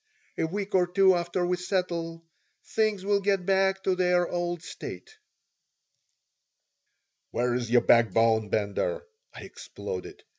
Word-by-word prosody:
"A 160 - -1
week 200 +3 -4
or 180 -2 +3
two 190 +1 +4
after 175 +1 -1
we 180 0 0
settle, 170 -3 -3 0.4
things 215 -3 0
will 200 0 +2
get 195 -2 0
back 195 0 +2
to 190 - +2
their 180 -1 +2
old 175 -1 -3
state." 440 - -9 2.1
"Where's 120 0 -1
your 120 0 +5
backbone, 115 -1 +3
Bender?" 110 - -1 0.3
I - - -9
exploded. 430 -2 -8
180 Hz, 120 wpm, -27 LUFS, 165-195 Hz, 2.1 s, your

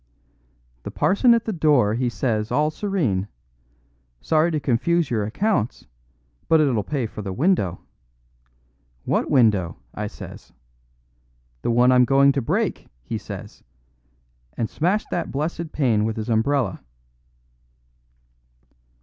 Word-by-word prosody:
"The - - -7
parson 235 +5 +3
at 230 - -1
the 220 - -2
door 145 - +3
he 120 +2 0
says 110 -3 -2
all 150 +1 +2
serene, 155 - -1 0.9
'Sorry 155 - +2
to 155 -2 -1
confuse 150 +5 0
your 110 -3 0
accounts, 185 - -1 0.6
but 160 - +4
it'll 135 -8 +2
pay 135 +1 -2
for 110 - -7
the 100 -2 -5
window.' 100 - 0 1.2
'What - - 0
window?' 105 -10 +2 0.2
I 105 0 -4
says. - - -11 1.1
'The - - -2
one 120 +2 +4
I'm 125 0 +5
going 140 +1 +5
to 140 0 -1
break,' 115 - -1 0.2
he - - -4
says, - - -9 0.9
and 115 - -1
smashed 185 +7 -1
that - - -2
blessed 160 +3 -3
pane 120 -8 +1
with 110 0 -2
his 110 +2 -4
umbrella." 115 -2 0
130 Hz, 125 wpm, -23 LUFS, 110-155 Hz, 1.2 s, I'm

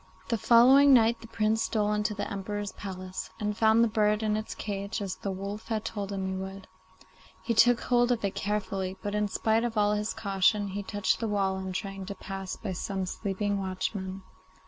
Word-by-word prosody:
The 230 - +1
following 260 +6 +7
night 230 -1 +3
the 225 - -10
Prince 220 0 +1
stole 210 -2 +1
into 210 0 0
the 205 - -3
Emperor's 205 0 -4
palace, 185 -1 -6
and 210 -1 -1
found 220 +1 +4
the - - +4
bird 210 0 +1
in 210 -1 +1
its 215 0 -4
cage 200 +1 -4
as 195 -3 -3
the 200 - -4
wolf 200 +3 -5
had 220 -1 -2
told 205 -2 -4
him 195 -1 -2
he 190 - -2
would. 190 +1 -6 0.8
He 235 - 0
took 240 +2 +5
hold 245 0 +2
of 225 -4 0
it 195 - -1
carefully, 195 -2 -2
but 205 - -3
in 210 0 +1
spite 220 +3 +1
of 235 -2 -2
all 210 0 +3
his 210 +1 -2
caution 200 0 +1
he 200 +2 -4
touched 205 0 0
the 230 - -1
wall 195 -2 0
in 190 0 -4
trying 195 +1 -5
to 200 - -5
pass 195 -1 -6
by 200 - -5
some 190 +1 -3
sleeping 200 +1 -2
watchmen. 190 0 -4
205 Hz, 205 wpm, -28 LUFS, 195-220 Hz, 0.8 s, following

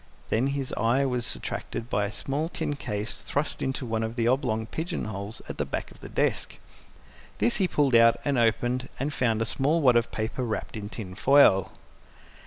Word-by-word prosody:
Then 120 +5 +2
his 140 -1 -2
eye 125 +4 +2
was 125 -3 -1
attracted 115 - -5
by 105 -3 0
a 100 - -4
small 145 +8 -2
tin 145 - -3
case 105 -5 -3
thrust 145 +2 -2
into 135 0 -2
one 110 -1 -1
of 110 +1 -3
the 115 -1 +1
oblong 120 -3 +1
pigeon 170 - -4
holes 105 +1 -2
at - - -7
the - - +2
back - - -4
of - - -16
the - - -10
desk. - - -1 0.8
This 235 - +2
he 190 -3 +2
pulled 145 -6 +1
out 115 0 +6
and 140 -1 +1
opened 120 +2 +1
and 145 +2 -2
found 115 -4 +1
a - - -3
small 140 +9 +1
wad 130 -6 +5
of 115 -1 +2
paper 110 +3 -3
wrapped 110 -2 -3
in 105 -1 -5
tin 100 -5 -7
foil. 100 -5 +5
120 Hz, 195 wpm, -27 LUFS, 110-140 Hz, 0.8 s, out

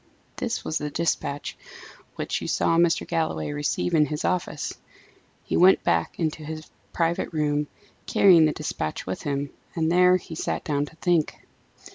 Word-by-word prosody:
This 245 -1 -3
was 155 - -1
the 150 - -3
despatch 145 -2 -2 0.6
which - - -3
you - - -4
saw 165 - +2
Mr. 170 0 +3
Galloway 165 -3 -1
receive 145 +4 -1
in 150 -2 +4
his 150 +2 -3
office. 180 -1 -1 0.7
He - - -2
went 185 +2 +6
back 85 -1 0
into 155 -2 -2
his 155 +1 -7 0.2
private 170 0 0
room, 150 -2 0 0.4
carrying 175 -5 +6
the 155 - +2
despatch 145 - -4
with 95 - -4
him, 140 -1 -2 0.2
and 160 -1 +1
there 180 +1 +5
he 170 - -10
sat 160 - -3
down 145 -1 -1
to 160 - -15
think. 170 -2 +1
160 Hz, 160 wpm, -25 LUFS, 145-170 Hz, 0.7 s, went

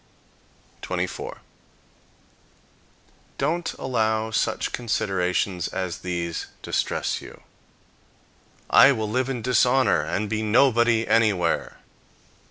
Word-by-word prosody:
24. - - -4 2.0
Don't 165 +5 -1
allow 110 -3 -1
such - - -1
considerations 95 -5 -1
as 90 -2 -4
these 85 -2 -4 0.2
distress - - -1
you. - - -13 1.3
"I 140 - +8
will 110 -4 -3
live 125 +4 -1
in 125 -4 -4
dishonor, 125 +1 +3
and 105 +2 -2
be 110 +1 -2
nobody 120 0 +3
anywhere." 105 -7 +1
110 Hz, 85 wpm, -24 LUFS, 95-125 Hz, 2.0 s, I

